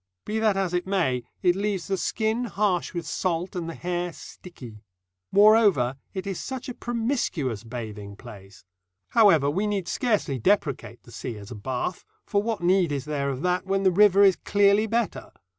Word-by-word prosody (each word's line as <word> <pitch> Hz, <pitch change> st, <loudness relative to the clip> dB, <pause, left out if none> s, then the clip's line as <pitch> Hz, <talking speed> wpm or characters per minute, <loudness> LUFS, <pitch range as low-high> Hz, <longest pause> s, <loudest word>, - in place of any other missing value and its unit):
Be 215 Hz, +1 st, -2 dB
that 215 Hz, -3 st, +2 dB
as 190 Hz, -2 st, -1 dB
it 180 Hz, +1 st, -1 dB
may, 165 Hz, -11 st, +1 dB, 0.2 s
it 180 Hz, -1 st, +4 dB
leaves 195 Hz, -3 st, -2 dB
the 195 Hz, -, 0 dB
skin 220 Hz, +5 st, -1 dB
harsh 200 Hz, -4 st, 0 dB
with 170 Hz, -2 st, -5 dB
salt, 180 Hz, 0 st, -2 dB
and 170 Hz, -2 st, -3 dB
the 165 Hz, -, -6 dB
hair 175 Hz, 0 st, -3 dB
sticky. 120 Hz, -, -12 dB, 0.5 s
Moreover, 200 Hz, -, +5 dB, 0.2 s
it 190 Hz, -, -4 dB
is 195 Hz, -2 st, -4 dB
such 260 Hz, -1 st, -6 dB
a 250 Hz, -, -4 dB
promiscuous 225 Hz, -, -2 dB
bathing 110 Hz, -4 st, -7 dB
place. 100 Hz, -5 st, -13 dB, 0.4 s
However, 195 Hz, -, +5 dB
we 190 Hz, +9 st, 0 dB
need 200 Hz, -4 st, -2 dB
scarcely 205 Hz, -, 0 dB
depreciate 140 Hz, -, 0 dB
the 120 Hz, -, -16 dB
sea 115 Hz, 0 st, -6 dB
as 100 Hz, +1 st, -11 dB
a -, -, -6 dB
bath, 130 Hz, -, -4 dB, 0.2 s
for 200 Hz, -, +1 dB
what 220 Hz, -3 st, -3 dB
need 180 Hz, -2 st, +3 dB
is 140 Hz, -2 st, -3 dB
there 145 Hz, -2 st, -2 dB
of 135 Hz, -1 st, -4 dB
that 180 Hz, +1 st, 0 dB
when 195 Hz, 0 st, 0 dB
the 190 Hz, -, +4 dB
river 200 Hz, +1 st, +5 dB
is 195 Hz, -2 st, +5 dB
clearly 205 Hz, +1 st, +3 dB
better? 230 Hz, 0 st, -2 dB
180 Hz, 180 wpm, -25 LUFS, 135-205 Hz, 0.5 s, Moreover